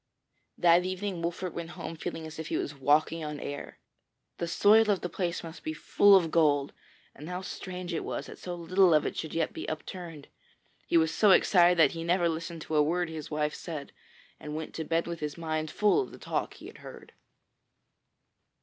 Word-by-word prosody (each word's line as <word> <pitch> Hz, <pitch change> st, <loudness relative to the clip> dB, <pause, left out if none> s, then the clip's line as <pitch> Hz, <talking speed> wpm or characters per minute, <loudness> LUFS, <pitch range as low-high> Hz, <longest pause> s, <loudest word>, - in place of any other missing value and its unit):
That 175 Hz, 0 st, +5 dB
evening 185 Hz, -1 st, -3 dB
Wolfert 175 Hz, +2 st, -3 dB
went 170 Hz, -1 st, -5 dB
home 165 Hz, -, -6 dB
feeling 160 Hz, 0 st, -5 dB
as 160 Hz, 0 st, -9 dB
if 160 Hz, -, -5 dB
he -, -, -1 dB
was 145 Hz, -, -3 dB
walking 150 Hz, +4 st, +2 dB
on 150 Hz, -1 st, -5 dB
air. 145 Hz, -, -7 dB, 0.6 s
The 170 Hz, -, -2 dB
soil 210 Hz, +5 st, +5 dB
of 200 Hz, -3 st, +2 dB
the 180 Hz, -, -3 dB
place 175 Hz, -2 st, -3 dB
must 165 Hz, +1 st, -9 dB
be 315 Hz, -, -4 dB
full 205 Hz, -8 st, +5 dB
of 170 Hz, -4 st, +3 dB
gold, 145 Hz, -4 st, +2 dB, 0.4 s
and 150 Hz, +4 st, -10 dB
how 180 Hz, +1 st, -4 dB
strange 180 Hz, -1 st, -6 dB
it 165 Hz, -, -2 dB
was -, -, -4 dB
that -, -, -11 dB
so 180 Hz, -1 st, -5 dB
little 175 Hz, 0 st, +3 dB
of 150 Hz, -, +3 dB
it -, -, -3 dB
should 160 Hz, -, -5 dB
yet 165 Hz, -, 0 dB
be -, -, -5 dB
upturned! 165 Hz, -1 st, -7 dB, 0.6 s
He -, -, +3 dB
was 160 Hz, 0 st, +2 dB
so 210 Hz, -, +4 dB
excited 180 Hz, -2 st, +5 dB
that 160 Hz, -4 st, +6 dB
he 165 Hz, 0 st, -5 dB
never 175 Hz, +1 st, +2 dB
listened 165 Hz, 0 st, -4 dB
to -, -, -7 dB
a -, -, +6 dB
word 170 Hz, +3 st, 0 dB
his 160 Hz, -2 st, -7 dB
wife 150 Hz, 0 st, -1 dB
said, 155 Hz, -5 st, -7 dB, 0.5 s
and 150 Hz, 0 st, -6 dB
went 160 Hz, 0 st, -5 dB
to 160 Hz, -, -4 dB
bed 165 Hz, +1 st, 0 dB
with 170 Hz, -1 st, -5 dB
his 150 Hz, 0 st, -4 dB
mind 155 Hz, -1 st, -2 dB
full 210 Hz, -, +3 dB
of 395 Hz, -, -6 dB
the -, -, -11 dB
talk -, -, -3 dB
he -, -, -13 dB
had -, -, -11 dB
heard. -, -, -12 dB
165 Hz, 210 wpm, -29 LUFS, 155-180 Hz, 0.6 s, that